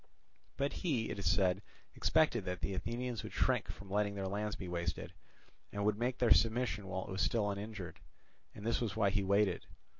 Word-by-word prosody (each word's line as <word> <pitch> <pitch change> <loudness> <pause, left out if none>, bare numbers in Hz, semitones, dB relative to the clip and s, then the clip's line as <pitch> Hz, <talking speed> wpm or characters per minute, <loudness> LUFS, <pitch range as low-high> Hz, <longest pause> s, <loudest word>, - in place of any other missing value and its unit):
But 140 +1 0
he, 130 -11 0
it - - -4
is 100 - +2
said, 95 -1 +3 0.3
expected 120 -9 +3
that 90 0 -3
the 100 - -1
Athenians 120 +4 -2
would - - -8
shrink - - +2
from 95 +1 -8
letting 100 0 +1
their 100 -1 -2
land 105 +2 -2
be 95 - -6
wasted, 85 -2 -3 0.6
and 100 0 -2
would 105 0 +2
make 125 +1 0
their 120 - +7
submission 115 -3 +1
while 95 0 -3
it - - -7
was 95 - -1
still 105 -3 +2
uninjured; 100 -2 -6 0.6
and 100 - -8
this 115 +1 +1
was 110 -5 -1
why 105 -3 +3
he 100 0 +1
waited. 100 -1 +2
100 Hz, 200 wpm, -35 LUFS, 95-115 Hz, 0.6 s, their